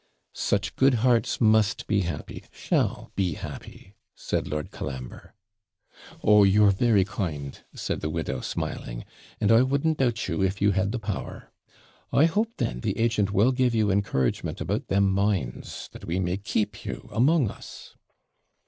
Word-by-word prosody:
'Such - - -1
good 135 -1 +4
hearts 120 -3 +2
must 110 -1 +3
be 105 -2 +1
happy 85 -5 -5
shall - - -1
be 95 -4 0
happy!' 95 - -9 0.2
said - - -2
Lord 75 0 -4
Colambre. 65 -2 -7 0.9
'Oh, 105 -1 +6
you're 100 +1 +5
very 100 -1 +3
kind,' 80 - -4 0.2
said - - -3
the 75 - -2
widow, 80 +1 -3
smiling; - - -4 0.3
'and 105 - +2
I 115 +1 +7
wouldn't 140 +4 +1
doubt 120 -4 0
you, - - -1
if 95 +1 0
you 100 0 +3
had 95 +1 0
the 125 - -2
power. 105 -4 -6 0.6
I 145 - +5
hope, 210 +7 +1
then, - - -2
the - - -2
agent 115 -3 +1
will 105 +6 +4
give 125 -2 +1
you 105 -2 +2
encouragement 80 -11 0
about - - -2
them 100 0 +3
mines, 95 - -2
that - - -11
we 85 +3 -1
may 90 0 -1
keep 105 +1 -2
you - - -6
among 135 -1 +3
us.' - - -12
100 Hz, 155 wpm, -26 LUFS, 95-115 Hz, 0.9 s, I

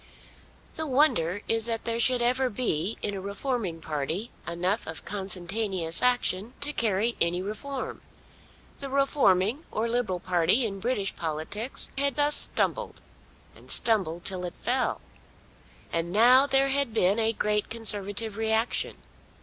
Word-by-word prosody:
The 315 0 -2
wonder 215 - +2
is 225 0 +1
that 230 -1 -2
there 230 0 -1
should 245 +1 +3
ever 255 +2 +2
be 205 -4 -1
in 205 - -1
a 195 - -4
reforming 200 -3 -3
party 160 - -3 0.2
enough 180 +5 -1
of 160 0 -6
consentaneous 190 -2 -2
action 245 -3 +1
to 295 +1 0
carry 225 0 +1
any 170 +1 +3
reform. 215 +8 -5 0.8
The 275 - -6
reforming 265 - +2
or 220 +2 -1
Liberal 230 -6 -1
party 180 +8 +3
in 195 -3 -4
British 205 -3 -1
politics 165 - -4
had 280 -1 +1
thus 295 0 +3
stumbled, - - -1 0.6
and - - -17
stumbled 185 -7 +1
till 185 -2 -2
it 175 - -5
fell. 255 +1 0 0.9
And 165 +1 -1
now 250 +7 +6
there 270 0 +3
had 275 -4 0
been 200 +1 +3
a 225 0 +2
great 210 -1 0
Conservative 210 -1 -1
reaction! 220 +1 0
220 Hz, 140 wpm, -27 LUFS, 185-250 Hz, 0.9 s, now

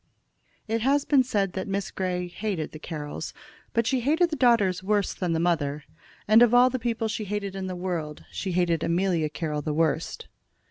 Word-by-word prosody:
It 225 +1 -1
has 275 +4 +2
been 280 -3 +5
said 200 -7 0
that 190 - -4
Miss 195 0 -2
Grey 180 -1 -2
hated 180 -4 -3
the 155 - -9
Carrolls; 150 -1 -6 0.4
but 230 0 +1
she 260 +2 +1
hated 320 +7 +2
the - - 0
daughters 210 - +3
worse 205 +1 +1
than 180 -3 -2
the 160 - 0
mother, 150 -4 0 0.4
and 215 +2 +7
of 240 0 +6
all 250 +1 +6
the 255 - -2
people 230 -1 -1
she 220 0 -3
hated 200 -1 -3
in 190 -1 -4
the 185 - -4
world 170 -5 -4
she 190 -2 -3
hated 170 -2 +1
Amelia 170 -2 +1
Carroll 150 -1 -3
the 150 +1 -3
worst. 160 -1 -1
190 Hz, 195 wpm, -26 LUFS, 165-225 Hz, 0.4 s, and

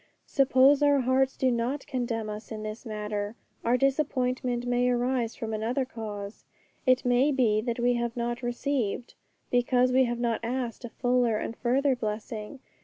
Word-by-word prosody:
But - - -27
suppose 275 +1 +5
our 285 -1 +4
hearts 260 +1 +2
do 260 -1 +2
not 245 +4 -1
condemn 240 -5 -2
us 210 +2 -7
in 215 -1 -5
this 215 +3 -6
matter, 210 0 -3 0.3
our 240 +2 +3
disappointment 255 -3 0
may 245 0 +2
arise 245 -1 0
from 220 -1 -4
another 235 +5 -1
cause. 210 -4 -7 0.4
It 255 0 +4
may 250 +4 +4
be 230 -6 +2
that 235 0 -2
we 245 0 +2
have 235 0 -2
not 240 0 -2
received, 245 -2 -2 0.4
because 245 +1 +3
we 260 +1 +4
have 240 0 -2
not 235 -2 0
asked 240 0 -3
a - - -6
fuller 245 -2 +1
and 225 - -4
further 265 +3 +2
blessing. 215 +2 -5
245 Hz, 170 wpm, -28 LUFS, 225-260 Hz, 0.4 s, suppose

